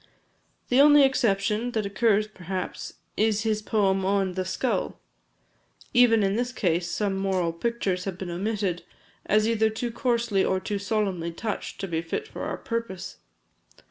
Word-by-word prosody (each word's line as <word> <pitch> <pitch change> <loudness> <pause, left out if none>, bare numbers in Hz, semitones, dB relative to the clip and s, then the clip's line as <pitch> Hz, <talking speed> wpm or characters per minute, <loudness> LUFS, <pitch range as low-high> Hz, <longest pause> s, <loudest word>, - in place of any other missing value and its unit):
The 250 +2 +5
only 290 0 +7
exception 230 -3 +1
that 220 -2 0
occurs, 210 +1 +2
perhaps, 185 -2 -5 0.2
is 215 -1 +1
his 215 -1 0
poem 195 -3 +1
on 195 0 +1
"The 185 +1 -3
Skull." 210 +7 -2 0.9
Even 235 -3 +5
in 195 0 +1
this 245 +1 -1
case 175 -7 0
some 200 -2 -1
moral 190 -3 0
pictures 190 -2 -2
have 190 -3 -4
been 185 -2 -5
omitted, 195 -1 -2 0.5
as 215 +1 +3
either 220 -1 +2
too 225 +2 -3
coarsely 230 -5 +1
or 190 - +1
too 205 +1 -3
solemnly 195 -5 -1
touched, 210 +5 -5
to 195 - -3
be 165 -2 -1
fit 300 - -4
for - - -8
our - - -3
purpose. 230 -7 -5
205 Hz, 155 wpm, -26 LUFS, 190-230 Hz, 0.9 s, only